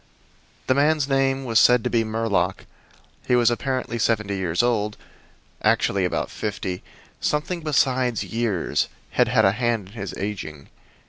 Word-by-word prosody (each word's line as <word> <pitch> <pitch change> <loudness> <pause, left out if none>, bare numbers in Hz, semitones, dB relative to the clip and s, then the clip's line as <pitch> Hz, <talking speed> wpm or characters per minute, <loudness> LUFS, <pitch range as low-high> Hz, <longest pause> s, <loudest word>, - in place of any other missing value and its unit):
The 130 - +3
man's 145 +1 +2
name 135 -1 +1
was 115 -2 +3
said 125 -2 +5
to - - 0
be 115 -1 +2
Murlock. 110 -2 -1 0.6
He 125 - +3
was 120 -1 +4
apparently 130 -1 -2
seventy 110 -2 0
years 90 0 0
old, 105 -3 0 0.6
actually 95 -2 +2
about 90 - -2
fifty. 100 -4 -4 0.4
Something 165 +4 -1
besides 130 -5 +1
years 115 -6 -1 0.2
had - - +3
had - - +3
a 95 - +5
hand 115 -3 -1
in - - -17
his 100 -4 -6
aging. 85 -8 -5
115 Hz, 145 wpm, -23 LUFS, 100-130 Hz, 0.6 s, said